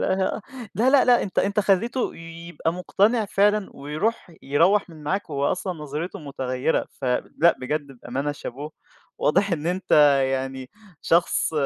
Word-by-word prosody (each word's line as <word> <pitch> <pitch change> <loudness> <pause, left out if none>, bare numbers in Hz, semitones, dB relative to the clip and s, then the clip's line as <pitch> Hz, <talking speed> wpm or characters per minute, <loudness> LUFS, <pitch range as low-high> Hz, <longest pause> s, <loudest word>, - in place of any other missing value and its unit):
لا، 220 +5 -1
لا، 275 -1 +5
لا 245 -1 +5
أنت 195 - -3
أنت 200 +1 +2
خلّيته 215 +6 +1
يبقى 165 0 -5
مقتنع 205 +5 +1
فعلًا 205 0 +2
ويرُوح 155 +9 -2
يروَّح 170 +8 +2
من 155 -2 -13
معاك 180 +3 -2
وهو 140 -1 -1
أصلًا 185 0 -3
نظريته 155 +5 -5
متغيّرة، 135 -2 -2
فلأ 140 +6 +2
بجد 145 +3 -2
بأمانة 135 +4 -4
شابوه، 145 +2 -7 0.5
واضح 195 +5 +2
إن 160 -1 -2
أنت 185 +1 -2 0.4
يعني 130 -1 -4 0.3
شخص 170 -1 +2
170 Hz, 135 wpm, -24 LUFS, 145-200 Hz, 0.5 s, لا